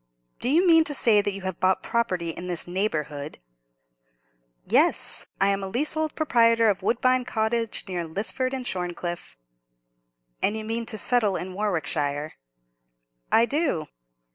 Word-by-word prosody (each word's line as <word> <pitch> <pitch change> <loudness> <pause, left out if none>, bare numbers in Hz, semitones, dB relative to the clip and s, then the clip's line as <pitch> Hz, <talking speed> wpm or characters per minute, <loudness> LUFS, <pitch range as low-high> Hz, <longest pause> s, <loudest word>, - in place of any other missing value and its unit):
"Do 245 - 0
you 335 +7 +3
mean 325 -2 +6
to 290 - +4
say 220 -5 +4
that 205 - -2
you 195 0 -7
have 185 -1 -5
bought 185 0 +1
property 185 -8 -1
in 175 +2 -8
this 175 -2 +1
neighbourhood?" 155 -6 -3 1.3
"Yes! - - +2
I 195 - +3
am 200 0 0
leasehold 300 +10 0
proprietor 230 -6 +3
of 195 - -5
Woodbine 255 +2 +1
Cottage, 225 -1 -1
near 180 -2 -3
Lisford 215 +10 -2
and 260 -2 -5
Shorncliffe." 175 - -4 1.0
"And 210 +2 +1
you 215 - -6
mean 230 +1 -3
to 215 - -1
settle 215 -3 +3
in 185 +1 -4
Warwickshire?" 155 -7 -2 1.0
"I 230 - +5
do." 280 - -1
210 Hz, 140 wpm, -25 LUFS, 180-245 Hz, 1.3 s, mean